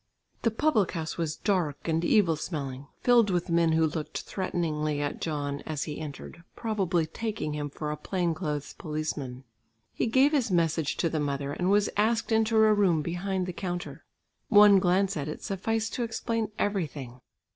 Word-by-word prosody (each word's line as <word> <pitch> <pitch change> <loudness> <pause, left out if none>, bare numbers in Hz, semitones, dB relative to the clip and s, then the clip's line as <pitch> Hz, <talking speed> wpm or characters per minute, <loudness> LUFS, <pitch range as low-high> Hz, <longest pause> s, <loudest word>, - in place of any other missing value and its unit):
The 230 - +3
public 225 - +1
house 160 -2 -3
was 160 -3 -1
dark 175 -9 -1
and 165 0 +1
evil 175 -3 +4
smelling, 140 -4 -5
filled 240 -4 +5
with 175 -1 -1
men 165 -1 +3
who 160 0 +4
looked 155 0 -3
threateningly 155 -5 -2
at 145 -1 -3
John 145 -3 -2
as 155 -2 -2
he 150 -2 -5
entered 155 +2 -8
probably 195 -7 0
taking 205 -2 -4
him 145 -1 -3
for 150 +1 -4
a 150 - -4
plain 175 -1 -1
clothes 150 -2 -4
policeman. 150 -4 -4 0.5
He - - 0
gave 265 +5 +4
his 275 -7 +1
message 165 -4 +1
to 165 - +1
the 155 - 0
mother 140 -1 -2
and 180 +4 -1
was 205 +1 +4
asked 220 +2 +1
into 220 0 +2
a 220 0 +6
room 185 -7 +3
behind 185 +2 -2
the 180 - -5
counter. 175 -1 -5 0.5
One 205 -2 +8
glance 190 +1 +2
at 145 -2 -3
it 155 - -6
sufficed 225 +3 -2
to 245 - -1
explain 230 -1 -2
everything. 145 -11 -3
170 Hz, 175 wpm, -28 LUFS, 150-205 Hz, 0.5 s, One